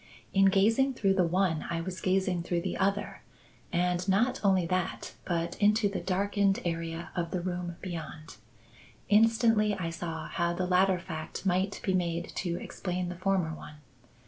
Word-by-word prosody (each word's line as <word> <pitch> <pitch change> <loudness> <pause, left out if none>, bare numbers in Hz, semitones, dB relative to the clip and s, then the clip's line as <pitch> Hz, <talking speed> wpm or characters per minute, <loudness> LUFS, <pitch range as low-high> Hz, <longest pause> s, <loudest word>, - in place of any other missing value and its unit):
In 195 0 +5
gazing 225 +8 +3
through 195 -3 +2
the 185 -3 +2
one 180 -2 +1
I 170 -1 -1
was 180 +1 -5
gazing 185 -1 +1
through 170 0 -1
the 185 +1 -3
other; 200 +1 -1 0.5
and 180 +1 0
not 235 +7 +2
only 190 -3 +3
that, 185 +1 -2
but 170 -1 -1
into 210 +1 +4
the 200 - -3
darkened 200 +1 +1
area 165 0 -3
of 170 -1 -1
the 180 - -2
room 175 -1 -4
beyond. 160 - -7 0.7
Instantly 225 0 +4
I 170 -3 -3
saw 165 -1 -5
how 170 -1 -1
the 180 +1 -1
latter 185 +1 +3
fact 165 0 -7
might 190 +2 +1
be 190 - +1
made 170 -2 -1
to 175 -2 -1
explain 180 -1 -4
the 180 - -5
former 185 -3 0
one. 150 -1 -10
185 Hz, 165 wpm, -29 LUFS, 170-195 Hz, 0.7 s, In